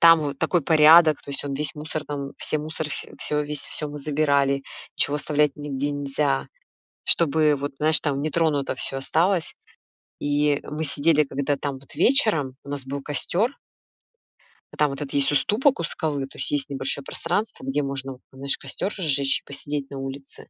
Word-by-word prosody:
там 165 -1 +8
вот 145 -2 -3
такой 175 -3 +1
порядок, 155 +1 +7
то - - -9
есть 140 0 -3
он 140 - -3
весь 145 +1 -1
мусор 155 0 -5
там, 140 -1 -5
все, 155 - 0
мусор, 155 +1 -4
ф 150 - -5
всё, 150 0 0
весь, 145 -1 0
всё 150 - -4
мы 145 0 -7
забирали, 140 -2 +1 0.3
чего 145 - +1
оставлять 150 0 +1
нигде 145 -1 -3
нельзя, 140 -1 -1 0.6
чтобы 155 -2 +3
вот, 140 +1 -4
знаешь, 155 +1 +5
там 140 -2 -1
нетронуто 155 -3 0
всё 135 +1 -2
осталось. 170 +6 +1 0.7
И 145 0 +1
мы 155 +2 -4
сидели, 150 +1 +3
когда 140 +1 -1
там 140 0 -3
вот 135 - -14
вечером 170 - +3
у - - -13
нас 140 -2 -3
был 140 +1 -4
костёр 170 - 0 1.2
а - - -10
там 150 -1 +2
вот 140 - -6
этот 140 -2 -5
есть 140 0 +2
уступок 220 - +2
у - - -1
скалы, 150 -3 -2
то 135 - -14
есть - - -1
есть 145 -1 0
небольшое 135 0 -1
пространство, 205 +10 -3
где 135 +2 -1
можно 135 -1 -4
вот, 125 - -17
знаешь, 135 +1 -2
костёр 195 - -4
разжечь 140 -6 +1
и - - -51
посидеть 140 0 -4
на 135 - -6
улице. 135 +1 -8
145 Hz, 185 wpm, -24 LUFS, 140-155 Hz, 1.2 s, там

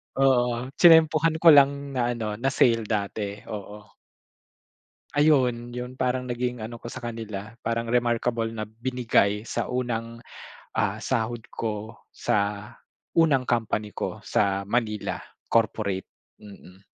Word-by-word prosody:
Oo, 125 -1 +2
tiyenempuhan 160 -1 +6
ko 165 - +10
lang 140 0 +4
na 125 -2 0
ano, 105 -2 -4
na 135 - 0
sale 115 -5 +3
dati, 100 -1 -3
oo. 105 0 -8 1.2
Ayun, 125 -5 +2
yon 125 +1 -6
parang 125 0 0
naging 125 -2 -3
ano 115 +1 -7
ko - - -9
sa 125 +1 -8
kanila 110 -2 -6
parang 115 0 -2
remarkable 120 -1 +1
na 110 - -3
binigay 110 -2 0
sa - - -3
unang, 115 -2 -3 0.5
ah, - - 0
sahod 115 0 -1
ko 110 0 -5
sa 100 0 -2 0.5
unang 140 -6 +4
company 110 -3 -1
ko - - -5
sa 100 0 +1
Manila 105 0 -1 0.3
corporate. 105 -4 +1 0.3
Mm. 100 -2 -14
115 Hz, 125 wpm, -25 LUFS, 105-125 Hz, 1.2 s, ko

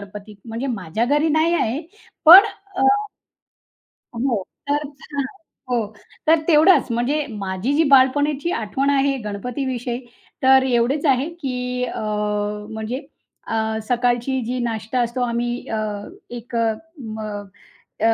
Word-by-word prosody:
गणपतीत 205 +1 -10
म्हणजे 230 +5 -3
माझ्या 195 +4 -2
घरी 295 +5 +2
नाही 315 +3 +2
आहे. 255 -1 0 0.5
पण 370 +5 +12 0.3
अ, 390 - +1 1.3
हो 235 -5 0 0.3
तर 295 0 +1 0.3
हां. 280 -1 -1 0.5
हो. 235 -4 +1 0.4
तर 325 +1 +6
तेवढचं. 305 -5 +5
म्हणजे 280 +6 0
माझी 200 +4 -3
जी 320 +2 +4
बालपणाची 285 +4 +4
आठवण 235 +6 -1
आहे 275 0 +2
गणपतीविषयी 245 +3 -4 0.4
तर, 265 0 +6
एवढेच 255 +5 +1
आहे 270 +3 +2
की 250 -2 -2
अ, 245 - -5 0.7
म्हणजे 220 +4 -4 0.5
अ, 220 0 -1
सकाळची 245 +1 +1
जी 250 +2 -2
नाश्ता 225 +2 -2
असतो 240 +1 -1
आम्ही 240 +1 -3
अ, 220 -1 -2 0.5
एक 235 0 -7
अ, 225 -1 +2 0.3
म 220 -3 -7 0.8
अ, 225 - +5
250 Hz, 125 wpm, -21 LUFS, 225-280 Hz, 1.3 s, पण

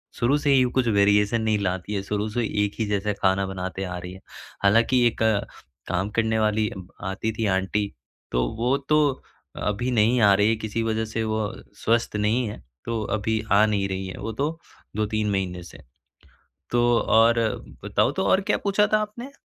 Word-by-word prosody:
शुरू 135 +5 +2
से 145 -1 +1
ही 130 -1 +5
कुछ 130 -2 +1
वेरिएशन 105 +2 +3
नहीं 110 -1 +1
लाती 95 +1 -2
हैं। 100 - -1
शुरू 105 +1 -2
से 120 +2 -1 0.2
एक 100 - -1
ही 110 - +1
जैसा 105 0 -1
खाना 95 0 +2
बनाते 95 0 -4
आ 90 -1 -4
रही 90 +1 -7
हैं। 95 - -12 0.4
हालाँकि 115 +5 +4
एक 115 - -3 0.7
काम 90 +4 -1
करने 110 -1 +2
वाली 110 0 +1
ब 90 -1 -9 0.2
आती 100 +4 -2
थी 110 - 0
आंटी 100 +2 -1 0.4
तो - - +1
वो 125 +4 +1
तो 150 0 +5 0.6
अभी 115 +5 -1
नहीं 115 +2 +3
आ 100 - +6
रही 105 +2 +3
हैं 115 - +1
किसी 110 +1 -2
वजह 110 0 -1
से 110 +1 -3
वो 110 -1 -1 0.3
स्वस्थ 115 -1 +1
नहीं 110 +4 +1
हैं 105 - -8 0.2
तो 115 -1 -2 0.2
अभी 110 +1 -1
आ 105 +2 +6
नहीं 100 -2 0
रही 95 0 -3
हैं। 95 - -7
वो 115 - -4
तो 160 +3 -1 0.4
2-3 110 0 -1
महीने 90 -2 -2
से। 85 - -13 0.9
तो 120 0 +2 0.2
और 115 +1 +4 0.4
बताओ - - +1
तो - - -2
और 190 - +4
क्या 210 - 0
पूछा 205 +1 +3
था - - +6
आपने? 235 +6 -6
110 Hz, 190 wpm, -24 LUFS, 100-115 Hz, 0.9 s, आ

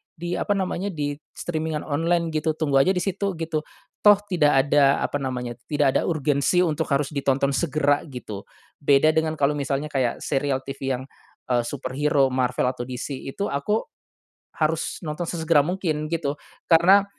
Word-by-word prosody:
di 175 0 -5
apa 205 - 0
namanya, 190 0 -2
di 150 -7 -2 0.2
streaming-an 160 -2 -3
online, 165 +3 0
gitu. 155 0 0
Tunggu 145 -4 +2
aja 185 +8 +3
di 180 - 0
situ, 195 0 -2
gitu. 165 -1 -2 0.4
Toh, 210 0 +7 0.2
tidak 150 -6 +4
ada, 140 -1 +4
apa 145 - -1
namanya, 125 -3 -4
tidak 145 -2 +2
ada - - +4
urgensi 155 +2 +2
untuk 160 -4 -1
harus 140 +1 0
ditonton 140 -1 +1
segera, 145 -1 +1
gitu. 115 -7 -8 0.3
Beda 145 +1 +4
dengan 160 0 0
kalau 145 -1 +2
misalnya 140 +1 -2
kayak, 130 -4 -1
serial 135 -1 -1
TV 135 -1 -3
yang, - - -7 0.5
eee, 120 -1 +3
superhero 135 +1 0
Marvel 125 -1 0
atau 120 -1 -7
DC, 130 +2 -6
itu 200 +9 -3
aku, 210 +11 0 0.7
harus 155 0 -1
nonton 155 +2 -3
sesegera 160 -3 +2
mungkin, 165 -5 -1
gitu. 145 -4 -1 0.3
Karena 180 +4 +6
150 Hz, 160 wpm, -24 LUFS, 135-165 Hz, 0.7 s, Toh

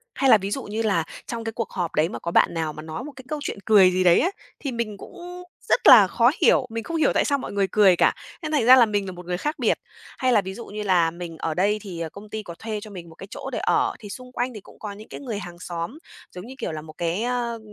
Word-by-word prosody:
Hay 270 -1 +2
là 220 - +9
ví 200 +1 -5
dụ 270 - -2
như 215 +2 -3
là 195 -7 +1 0.2
trong 230 -1 -4
cái 225 - -3
cuộc 230 0 -4
họp 175 -3 -3
đấy 155 +3 +2
mà - - -6
có 170 - -4
bạn - - +4
nào 160 -2 -2
mà 155 - -8
nói 160 +10 -6
một 295 - -8
cái 260 - -11
câu 305 -1 -3
chuyện - - -4
cười 195 -4 +6
gì 185 0 +1
đấy 175 -1 +6
á, 360 - +2 0.3
thì 275 - -4
mình 225 -4 -3
cũng 355 - -10 0.3
rất - - +3
là 210 -6 +10
khó 235 +6 +3
hiểu, 255 - +4
mình 225 0 -4
không 330 +5 -3
hiểu 315 - +3
tại - - +2
sao 285 -1 +2
mọi 265 - -6
người 200 -1 +1
cười 195 -4 +6
cả, - - +3 0.3
nên 310 -1 -4
thành 290 -7 +2
ra 255 - +10
là 245 -3 +7
mình 205 -2 -1
là 185 - -5
một 180 0 -10
người 180 0 -2
khác 300 - -3
biệt. - - +2 0.4
Hay 255 -1 +1
là 210 - +5
ví 190 0 -6
dụ 235 - -8
như 210 +1 -6
là 175 -4 +3
mình 170 -1 -8
ở 160 - -2
đây 205 +4 +1
thì, 180 -5 -7
ờ, 165 -1 -3
công 205 +4 -12
ty 220 -1 -5
có 170 -3 -9
thuê 220 -1 -4
cho 215 - -10
mình 170 -3 -9
một 160 - -15
cái 195 - -10
chỗ - - -6
để - - -3
ở, - - +1
thì 205 -3 -10
xung 250 +3 -9
quanh 250 0 -2
thì 210 - -9
cũng - - -18
có 210 -2 -6
những 210 +2 -11
cái - - -8
người 235 -7 -4
hàng 175 -2 -9
xóm, 175 - -5 0.3
giống 180 +3 -9
như 260 - -9
kiểu, - - -3
là 155 -1 -5
một 155 0 -12
cái, 175 +6 -1
ơ, 240 -2 -2
210 Hz, 310 wpm, -24 LUFS, 175-240 Hz, 0.4 s, là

